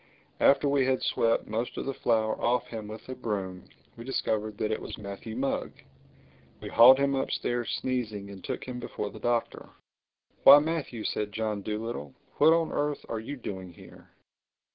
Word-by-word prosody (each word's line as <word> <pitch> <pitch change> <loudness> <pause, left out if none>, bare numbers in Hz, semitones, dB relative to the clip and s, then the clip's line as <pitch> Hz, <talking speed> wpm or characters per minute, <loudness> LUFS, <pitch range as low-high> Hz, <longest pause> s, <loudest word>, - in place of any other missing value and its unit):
After 140 +1 +5
we 140 -2 +2
had 130 -1 +1
swept 115 0 +1
most 115 +3 -3
of - - -3
the 135 - -2
flour 110 -3 +1
off 120 +1 +1
him 110 -2 -7
with 110 +1 -9
a 130 - -5
broom, 100 -7 -4 0.3
we 115 - -9
discovered 110 -4 -2
that 110 - -1
it 110 - -2
was - - -7
Matthew 100 +2 -7
Mugg. 135 +2 -2 0.9
We - - -7
hauled 125 +3 +8
him 140 0 +1
upstairs 120 -3 -1
sneezing 110 -6 -3
and 95 -2 -11
took - - -4
him 125 -1 -6
before 105 -3 -5
the - - -11
Doctor. 120 -1 -1 0.7
"Why - - +10
Matthew!" 145 -7 -2
said 105 -1 -2
John 110 -2 -2
Dolittle. 105 - -5 0.2
"What 155 +2 +6
on 165 0 +2
earth 145 0 -2
are 115 - -2
you 140 +6 -6
doing 95 -6 -7
here?" - - -15
115 Hz, 175 wpm, -28 LUFS, 105-130 Hz, 0.9 s, Why